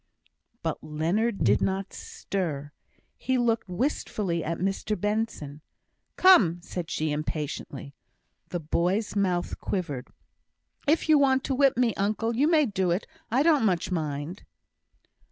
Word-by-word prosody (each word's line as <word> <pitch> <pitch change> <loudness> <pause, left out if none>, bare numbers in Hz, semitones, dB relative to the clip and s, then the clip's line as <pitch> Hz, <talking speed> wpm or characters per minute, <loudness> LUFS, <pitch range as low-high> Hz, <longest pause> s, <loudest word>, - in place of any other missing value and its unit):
But 160 -2 -3
Leonard 170 +9 0
did - - +4
not 195 0 -1
stir. 150 -7 -4 0.5
He 260 0 0
looked 230 -4 +1
wistfully 185 - -1
at 165 +1 -2
Mr 195 +2 -1
Benson. 205 -8 -2 0.5
"Come!" 205 - +6
said 175 -3 -5
she, 155 0 -1
impatiently. 150 -2 -4 0.6
The 175 - -3
boy's 180 +8 0
mouth 180 -3 0
quivered. 150 -10 -3 0.8
"If 315 +3 +2
you 310 -2 +6
want 265 -1 +3
to 270 - -1
whip 270 -2 +3
me, 245 -3 +3
uncle, 215 +3 0
you 280 +6 +3
may 315 -3 +4
do 190 -5 0
it. 175 +5 0 0.2
I 255 +5 +3
don't 310 -6 +4
much 185 -4 +1
mind." 155 +1 -3
195 Hz, 135 wpm, -27 LUFS, 165-235 Hz, 0.8 s, Come